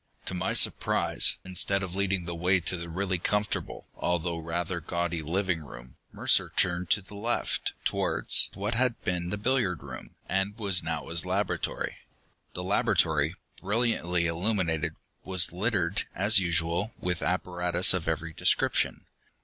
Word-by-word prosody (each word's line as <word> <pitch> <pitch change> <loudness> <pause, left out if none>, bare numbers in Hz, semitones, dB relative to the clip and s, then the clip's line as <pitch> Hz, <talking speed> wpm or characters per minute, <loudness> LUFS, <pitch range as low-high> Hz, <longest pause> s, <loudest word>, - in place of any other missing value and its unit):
To - - -2
my 90 - -1
surprise, - - +3
instead 95 +1 +2
of 95 -1 -5
leading 95 -2 0
the 85 - -4
way 90 +3 +2
to 90 +1 -1
the 85 -1 -5
really 95 +1 -1
comfortable, 105 +4 -2
although 85 -1 -1
rather 85 +2 -3
gaudy 85 +1 -2
living 85 +1 -1
room, - - -12 0.2
Mercer - - +2
turned 90 -1 +1
to 100 - +2
the 100 - -14
left, 115 +4 -1
towards - - +2
what 105 +3 -2
had 120 0 +1
been 90 -1 -1
the 105 - -2
billiard 105 - 0
room, 65 -3 -9
and 95 +2 -1
was 100 -5 +2
now 80 -3 -3
his 85 -1 +1
laboratory. 95 +3 -2 0.6
The 90 - -4
laboratory, 80 -4 +2 0.3
brilliantly 100 -5 +1
illuminated, 85 -2 0 0.3
was 95 -1 +2
littered, 100 -1 0
as 100 +3 +5
usual, 85 +4 0
with 90 -2 -2
apparatus 90 0 +2
of 90 -4 -2
every 80 0 -2
description. - - +2
90 Hz, 145 wpm, -28 LUFS, 85-100 Hz, 0.6 s, as